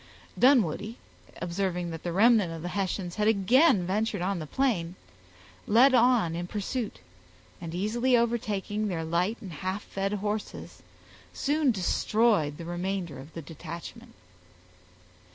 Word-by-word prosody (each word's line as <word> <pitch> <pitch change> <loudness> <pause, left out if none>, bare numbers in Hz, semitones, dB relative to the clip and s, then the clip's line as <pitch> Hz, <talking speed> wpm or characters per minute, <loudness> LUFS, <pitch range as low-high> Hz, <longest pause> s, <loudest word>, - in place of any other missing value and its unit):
Dunwoodie, 230 - +3 0.5
observing 175 -1 -2
that 165 -1 -6
the 175 - -3
remnant 210 -1 +4
of 165 -1 -7
the 175 - -3
Hessians 190 -2 -3
had 210 0 +1
again 220 - +4
ventured 200 0 -1
on 190 0 -1
the 155 - -6
plain, 185 - 0 0.7
led 250 +6 +6
on 240 -8 +4
in 175 +1 -4
pursuit, 215 +3 -4 0.6
and 165 0 -6
easily 235 +7 +2
overtaking 215 -3 -1
their 170 -4 -2
light 175 +7 0
and 190 -6 -8
half 185 +5 -4
fed 195 +1 -3
horses, 210 +1 -4 0.5
soon 295 0 +1
destroyed 205 - +1
the 170 - -8
remainder 175 -2 -3
of 145 +4 -12
the 165 - -6
detachment. 200 - -9
195 Hz, 135 wpm, -28 LUFS, 175-230 Hz, 0.7 s, led